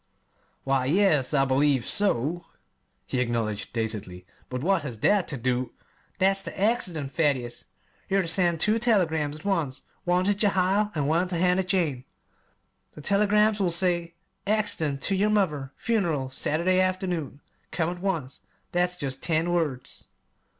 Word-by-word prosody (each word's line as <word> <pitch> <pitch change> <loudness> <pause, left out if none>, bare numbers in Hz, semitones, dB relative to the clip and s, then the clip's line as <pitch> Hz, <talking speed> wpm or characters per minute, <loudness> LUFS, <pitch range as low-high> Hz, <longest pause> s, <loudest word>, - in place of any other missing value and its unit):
"Why 135 -1 +1
yes 155 -3 +2
I 135 -3 +3
believe 135 -1 +2
so," 175 - +1 0.6
he 130 - -2
acknowledged 115 -4 -2
dazedly; 105 -6 -3 0.2
"but 125 +1 -4
what 190 0 +2
has 130 -6 -6
that 205 -3 +3
to 150 - -4
do 125 +1 -1 0.2
" - - -37
"That's 195 +1 +2
the 195 - -7
'accident,' 180 - 0
Thaddeus. 140 -6 -1 0.4
You're 195 0 +3
ter - - -5
send 170 -1 +2
two 215 +6 +2
telegrams 160 -11 +1
at 155 - -12
once 165 -10 -1 0.2
one 180 +1 +1
ter 205 - +3
Jehiel, 200 0 +2
an' 145 -2 0
one 165 +5 +1
ter 180 -1 -2
Hannah 180 +2 +3
Jane. 170 -9 -1 0.9
The 150 - -11
telegrams 210 +3 +3
will 190 -3 +2
say: 170 -1 0 0.3
'Accident 165 -10 0
to 195 - +1
your 205 +3 +2
mother. 150 -11 0
Funeral 165 - -1
Saturday 170 +7 +1
afternoon. 180 -7 -2 0.3
Come 170 -1 -1
at 175 0 -8
once.' 165 -9 -3 0.3
That's 180 0 +1
jest 135 -6 -3
ten 165 +1 +1
words." 150 -7 -3
170 Hz, 150 wpm, -26 LUFS, 135-190 Hz, 0.9 s, I